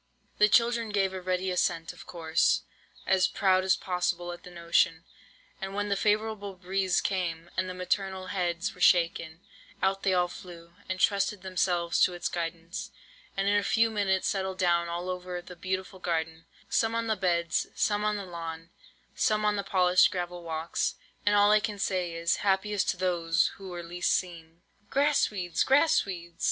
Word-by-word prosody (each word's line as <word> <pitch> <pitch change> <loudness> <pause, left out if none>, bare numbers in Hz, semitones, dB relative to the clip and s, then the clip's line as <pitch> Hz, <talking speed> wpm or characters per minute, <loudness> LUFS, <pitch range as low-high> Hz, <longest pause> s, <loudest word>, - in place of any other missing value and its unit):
"The 210 - +6
children 235 +1 +3
gave 195 -2 +1
a 190 - -5
ready 185 +1 -1
assent, 165 -2 0
of - - -14
course, 165 -1 +1 0.4
as 190 -1 +3
proud 185 -1 +2
as 190 - +3
possible 180 -1 -2
at 175 - -9
the - - -12
notion; 170 -1 +1 0.6
and 195 0 -5
when 205 0 -1
the 200 - +2
favourable 210 -1 0
breeze 185 0 0
came, 175 -3 -2
and 185 0 -1
the 180 - -6
maternal 185 0 -2
heads 175 0 -1
were 180 - -15
shaken, 170 -2 +3 0.4
out 195 0 +1
they 195 - +1
all 180 0 +3
flew, 170 -2 -11 0.2
and 185 0 -2
trusted 200 0 +1
themselves 175 -2 0
to 180 - +4
its 175 - -2
guidance, 170 +1 -5 0.5
and 195 0 0
in 205 - +3
a - - +3
few 225 +2 +2
minutes 195 -3 +1
settled 190 -1 -2
down 170 -2 +2
all 175 +1 -4
over 180 -1 -4
the 180 +1 -11
beautiful 185 +2 -4
garden, 165 -2 -2 0.2
some 225 0 +1
on 230 0 0
the 220 -1 +1
beds, 170 -3 0
some 205 0 +1
on 210 0 +1
the 200 - -5
lawn, 165 -1 -7 0.4
some 215 0 +1
on 210 0 +2
the 200 - -1
polished 180 -2 +4
gravel 175 -1 -4
walks. 165 0 -2 0.3
And 205 - +5
all 205 0 +5
I 215 - +6
can 210 0 -4
say 185 -3 -1
is, 170 0 +1
happiest 200 0 0
those 170 -3 +1
who 195 -1 -9
were 175 -1 -6
least 175 +1 -1
seen!" 170 -2 -4 0.3
"Grass 290 +1 +3
weeds! 180 -5 -1
grass 285 +4 +4
weeds!" 175 -3 -8
185 Hz, 180 wpm, -28 LUFS, 170-200 Hz, 0.6 s, The